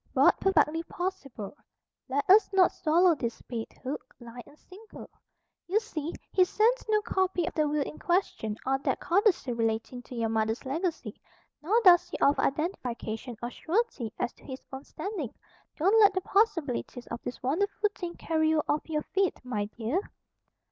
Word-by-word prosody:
"But - - +5
perfectly 330 -4 +3
possible. 335 - -5 0.5
Let 280 +2 -1
us 405 +4 +6
not 380 -2 +5
swallow 345 +2 +3
this 235 -6 -4
bait, 230 -3 -5
hook, 260 0 -6
line 240 0 -10
and 295 - -18
sinker. 415 +7 -13 0.6
You 395 +5 +3
see, 335 -8 -5 0.2
he 370 - +5
sends 450 +7 +2
no 425 -1 +3
copy 375 -4 0
of - - -4
the 305 -2 +1
will 295 -1 +1
in 295 - -8
question, 345 - 0
or 270 0 +1
that - - -1
codicil 360 - +2
relating 230 +2 -2
to 245 - -11
your 230 -1 0
mother's 220 +2 -1
legacy; 330 +6 -3 0.4
nor 400 +10 +3
does 355 -3 +7
he - - -4
offer 280 - +3
identification 245 - -3
or 240 - -3
surety 330 - -1
as - - -2
to - - -23
his 260 -1 -8
own 265 +1 -6
standing. 375 - -5 0.4
Don't 390 +8 +4
let 405 -2 +6
the 375 - +1
possibilities 330 - 0
of 235 - -6
this 245 - -7
wonderful 400 - +1
thing 350 -2 -6
carry 315 -1 0
you 315 -1 +2
off 300 +2 -1
your 305 -1 -1
feet, 385 -1 0
my 210 -5 -2
dear." 235 - -2
310 Hz, 170 wpm, -29 LUFS, 245-380 Hz, 0.6 s, does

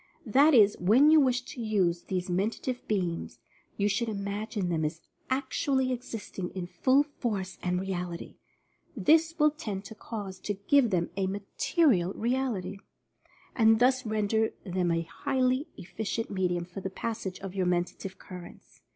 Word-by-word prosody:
That 275 +6 +5
is, 210 -3 +6
when 240 - +5
you 315 - +8
wish 255 -3 +2
to 250 -1 -8
use 185 -6 +1
these 185 -1 -2
Mentative 215 +7 -1
Beams, 180 -5 -2 0.4
you 200 - +2
should 225 +3 0
imagine 205 -1 -3
them 160 -2 0
as 155 +1 -2 0.3
actually 265 0 0
existing 225 -7 -5
in 185 -2 -3
full 260 +11 +3
force 215 -10 -4
and 180 0 0
reality 180 -2 -5 0.3
— - - -29
this 325 +1 +5
will 300 -1 +5
tend 210 -10 -5
to 210 - -8
cause 205 -4 -7
to 205 - -3
give 240 +6 +3
them 175 -4 0
a 195 -1 +1
material 195 - +1
reality, 230 -6 -1 0.8
and 225 -2 +5
thus 255 +1 +3
render 220 0 0
them 180 -2 -1
a 165 0 +1
highly 260 - 0
effi 185 +3 -8
cient 225 +2 -2
medium 180 -3 0
for 180 +2 -8
the 190 - -3
passage 195 -2 -4
of 195 -2 -6
your 190 -2 0
Mentative 180 +2 -2
Cur 180 -1 -9
rents. - - -15
205 Hz, 160 wpm, -29 LUFS, 185-255 Hz, 0.8 s, you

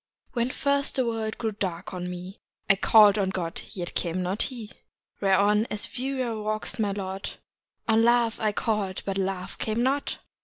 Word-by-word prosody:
"VV7HEN 240 +1 +1
first 280 +1 +1
the 260 - +2
world 225 -2 -2
grew 225 -2 -1
dark 190 -3 -4
to 185 - -5
me 180 +1 -6 0.3
I 195 - +6
call'd 210 +1 +6
on 190 -1 +1
God, 175 -3 -3
yet 175 -2 -5
came 180 +1 -1
not 185 +4 0
he. 235 -5 -2 0.5
Whereon, 205 +3 +4
as 210 -1 -3
wearier 255 -4 -1
wax'd 215 +2 -2
my 210 -2 +2
lot, 195 -1 -4 0.5
On 225 -1 +4
Love 235 -1 +3
I 215 -2 +2
call'd, 210 -3 -1
but 195 0 -1
Love 190 -1 -3
came 220 +2 0
not. 275 +2 0
210 Hz, 175 wpm, -27 LUFS, 190-230 Hz, 0.5 s, I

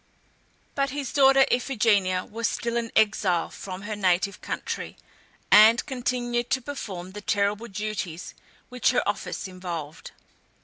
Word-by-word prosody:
But 275 -1 0
his 275 -1 -5
daughter, 270 -1 +6
Iphigenia, 210 -7 +2
was 230 +1 -2
still 235 0 -3
an 235 -1 -1
exile 200 -5 +2
from 190 0 -8
her 210 +1 -4
native 190 0 0
country, - - -5 0.5
and 220 +3 +7
continued 245 -2 -2
to 260 - +1
perform 190 -11 -6
the 210 +2 -8
terrible 205 +1 0
duties 195 -5 -5 0.4
which 250 0 +1
her - - +1
office - - -3
involved. 170 -4 -7
215 Hz, 130 wpm, -25 LUFS, 185-240 Hz, 0.5 s, and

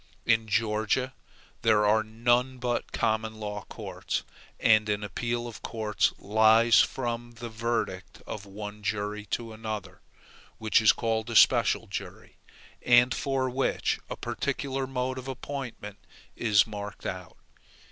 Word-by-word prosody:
In 110 -1 +3
Georgia 110 +4 0 0.5
there 105 -1 +4
are 110 +1 +4
none 120 +4 +1
but 125 -1 -2
common 110 0 0
law 105 -1 -5
courts, - - -4 0.4
and 110 -1 +4
an 105 0 0
appeal 120 +3 -2
of 115 - -9
course 110 -3 0
lies 110 +2 +5
from 120 -2 -1
the 120 0 -7
verdict 110 -5 -3
of 100 -2 -7
one 105 +1 -8
jury 105 0 -3
to 115 -2 -3
another, 110 -3 -6 0.6
which 110 0 +3
is 110 - +7
called 115 -1 -1
a 115 - -4
special - - +5
jury, - - -8 0.4
and 120 +1 +5
for 135 -2 -1
which 130 +1 0
a - - -5
particular 135 -1 -2
mode 130 0 -2
of 130 - -9
appointment 130 -6 -6 0.4
is 105 -5 +4
marked 105 -2 -7
out. 90 -2 -6
110 Hz, 135 wpm, -28 LUFS, 105-120 Hz, 0.6 s, is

